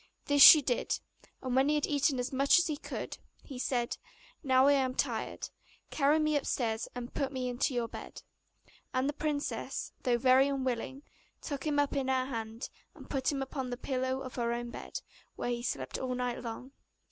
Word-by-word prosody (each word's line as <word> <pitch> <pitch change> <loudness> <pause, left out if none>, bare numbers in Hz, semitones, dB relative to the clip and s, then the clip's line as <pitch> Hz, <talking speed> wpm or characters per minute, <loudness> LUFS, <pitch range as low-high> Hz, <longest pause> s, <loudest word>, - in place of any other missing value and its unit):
This 285 -1 +3
she 300 +1 +11
did, 245 -2 0 0.4
and 255 -1 -1
when 265 +2 +4
he 300 - +3
had 295 - +1
eaten 285 -1 +1
as 250 +2 -3
much 275 +4 +5
as 350 - +4
he 305 - -1
could, - - -6 0.2
he 265 -4 -8
said, 245 -2 -1 0.5
'Now 260 -1 +4
I 285 - +6
am 260 -2 +1
tired; - - -2 0.4
carry 290 +1 +3
me 305 -1 +1
upstairs, 235 -5 -1
and 245 -1 -6
put 275 -2 -1
me 260 -2 -3
into 250 +2 -1
your 235 -1 0
bed.' - - -9 0.7
And 255 +1 +2
the 290 - -1
princess, 295 -1 -3
though 245 -3 +2
very 260 +2 +5
unwilling, 265 0 -2 0.4
took 285 +1 -5
him 295 -1 +1
up 290 0 +1
in 270 -2 0
her 260 -1 +1
hand, 230 -2 -5 0.2
and - - -13
put 270 -1 +1
him 275 -2 -2
upon 265 -1 -4
the 245 - -4
pillow 260 0 -2
of 255 -1 -7
her 235 -1 0
own 240 0 -4
bed, - - -7 0.3
where 245 - -2
he 240 0 -2
slept 135 - -3
all 255 -1 -2
night 250 -1 -2
long. 245 +3 -7
260 Hz, 195 wpm, -31 LUFS, 245-280 Hz, 0.7 s, she